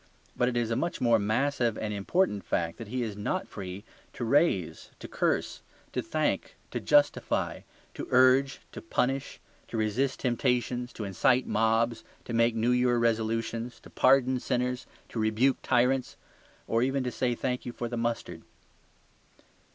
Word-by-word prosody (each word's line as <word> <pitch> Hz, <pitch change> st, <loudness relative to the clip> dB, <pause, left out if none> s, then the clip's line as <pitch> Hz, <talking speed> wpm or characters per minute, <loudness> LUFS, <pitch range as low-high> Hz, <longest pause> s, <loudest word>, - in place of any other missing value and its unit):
But 125 Hz, -, +2 dB
it 120 Hz, -, -2 dB
is 115 Hz, -1 st, 0 dB
a -, -, +1 dB
much 170 Hz, +8 st, -2 dB
more 120 Hz, -2 st, +4 dB
massive 120 Hz, +2 st, 0 dB
and 105 Hz, -1 st, -3 dB
important 105 Hz, -, 0 dB
fact 85 Hz, -1 st, -2 dB
that 115 Hz, -, -7 dB
he 125 Hz, +3 st, -2 dB
is 110 Hz, -3 st, -4 dB
not 105 Hz, -, -2 dB
free 95 Hz, 0 st, -7 dB, 0.3 s
to 120 Hz, -, -4 dB
raise, 120 Hz, -, +1 dB
to -, -, -9 dB
curse, -, -, -1 dB, 0.3 s
to -, -, 0 dB
thank, -, -, -1 dB, 0.2 s
to -, -, -2 dB
justify, 145 Hz, -1 st, +2 dB, 0.3 s
to -, -, -6 dB
urge, 130 Hz, +2 st, +4 dB
to -, -, -8 dB
punish, 135 Hz, -4 st, -1 dB, 0.3 s
to -, -, -5 dB
resist 115 Hz, +5 st, 0 dB
temptations, 125 Hz, 0 st, 0 dB
to 110 Hz, -, -6 dB
incite 120 Hz, +6 st, +2 dB
mobs, 115 Hz, +1 st, +1 dB, 0.2 s
to 115 Hz, -, -5 dB
make 115 Hz, 0 st, +3 dB
New 115 Hz, +2 st, +2 dB
Year 125 Hz, 0 st, +3 dB
resolutions, 115 Hz, +1 st, -1 dB
to -, -, -15 dB
pardon 130 Hz, -1 st, +4 dB
sinners, 125 Hz, 0 st, -2 dB, 0.2 s
to 115 Hz, -, -5 dB
rebuke 110 Hz, +5 st, +2 dB
tyrants, 125 Hz, +2 st, +1 dB, 0.5 s
or 115 Hz, -, +1 dB
even 135 Hz, +1 st, +1 dB
to 125 Hz, -, -2 dB
say 120 Hz, 0 st, 0 dB
"thank 125 Hz, +1 st, -2 dB
you" -, -, -3 dB
for 120 Hz, 0 st, -4 dB
the 120 Hz, -, -4 dB
mustard. 115 Hz, 0 st, -3 dB
120 Hz, 160 wpm, -28 LUFS, 115-130 Hz, 0.5 s, more